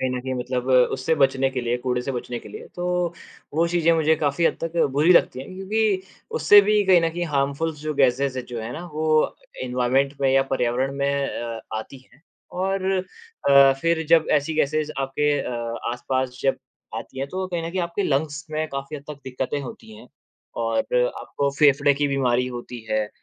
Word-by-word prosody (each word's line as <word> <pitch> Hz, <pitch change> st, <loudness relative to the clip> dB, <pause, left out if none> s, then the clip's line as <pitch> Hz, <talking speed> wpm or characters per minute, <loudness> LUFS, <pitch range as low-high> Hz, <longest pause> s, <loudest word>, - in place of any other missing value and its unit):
कहीं 130 Hz, -1 st, 0 dB
न 125 Hz, 0 st, -2 dB
कहीं 130 Hz, 0 st, -4 dB
मतलब 125 Hz, +1 st, -3 dB, 0.2 s
उससे 135 Hz, +5 st, 0 dB
बचने 135 Hz, -2 st, +2 dB
के 130 Hz, -1 st, -3 dB
लिए, 120 Hz, 0 st, -1 dB
कूड़े 125 Hz, 0 st, -1 dB
से 135 Hz, -, -3 dB
बचने 120 Hz, 0 st, -4 dB
के -, -, -12 dB
लिए, -, -, -9 dB
तो 180 Hz, -1 st, -1 dB, 0.4 s
वो 165 Hz, +2 st, +3 dB
चीज़ें 170 Hz, -1 st, +3 dB
मुझे 160 Hz, -1 st, +3 dB
काफ़ी 150 Hz, +2 st, 0 dB
हद -, -, 0 dB
तक 165 Hz, +1 st, -4 dB, 0.2 s
बुरी 155 Hz, +6 st, +5 dB
लगती 130 Hz, -6 st, +3 dB
हैं। 185 Hz, +7 st, -9 dB
क्योंकि 195 Hz, 0 st, 0 dB, 0.4 s
उससे 205 Hz, -, +8 dB
भी 210 Hz, +1 st, +3 dB
कहीं 185 Hz, -2 st, +6 dB
न 165 Hz, -, +1 dB
कहीं 175 Hz, +1 st, -3 dB
हार्मफुल 140 Hz, +4 st, 0 dB
जो 155 Hz, +1 st, -4 dB
गैसेज़ 135 Hz, -1 st, +2 dB
जो 120 Hz, -2 st, -6 dB
है 115 Hz, +2 st, -5 dB
ना, 170 Hz, +3 st, -6 dB
वो 155 Hz, 0 st, +1 dB, 0.3 s
एनवॉरमेंट 130 Hz, +3 st, +1 dB
में 135 Hz, -, +3 dB
या 135 Hz, 0 st, +5 dB
पर्यावरण 130 Hz, +1 st, 0 dB
में 140 Hz, 0 st, 0 dB
अ, 115 Hz, -1 st, -5 dB, 0.2 s
आती 130 Hz, +4 st, -9 dB
है। 135 Hz, -, -22 dB, 0.3 s
और 190 Hz, +1 st, -1 dB, 0.7 s
अ, 140 Hz, -1 st, +7 dB
फ़िर 165 Hz, -1 st, +1 dB
जब 165 Hz, 0 st, +4 dB
ऐसी 150 Hz, +2 st, +1 dB
गैसेज़ 155 Hz, 0 st, 0 dB
आपके 135 Hz, +2 st, 0 dB
अ, 115 Hz, -1 st, -4 dB
आसपास 130 Hz, +1 st, -2 dB
जब 135 Hz, -, +2 dB, 0.4 s
आती 130 Hz, -, -7 dB
हैं, 135 Hz, +1 st, -3 dB
तो 185 Hz, +2 st, -3 dB
कहीं 170 Hz, -2 st, -3 dB
न -, -, -4 dB
कहीं 185 Hz, 0 st, -2 dB
आपके 170 Hz, +3 st, -2 dB
लंग्स 145 Hz, -1 st, -1 dB
में 155 Hz, 0 st, -1 dB
काफ़ी 140 Hz, +2 st, -5 dB
हद 140 Hz, -, -11 dB
तक 145 Hz, -2 st, -8 dB
दिक्कतें 130 Hz, +2 st, -3 dB
होती 110 Hz, -4 st, -10 dB
हैं। 120 Hz, +3 st, -14 dB, 0.5 s
और 115 Hz, 0 st, +1 dB, 0.4 s
आपको 140 Hz, 0 st, -2 dB
फेफड़े 145 Hz, -1 st, +5 dB
की 145 Hz, +1 st, 0 dB
बीमारी 125 Hz, -2 st, +1 dB
होती 120 Hz, 0 st, -7 dB
है 110 Hz, -1 st, 0 dB
140 Hz, 195 wpm, -23 LUFS, 130-160 Hz, 0.7 s, उससे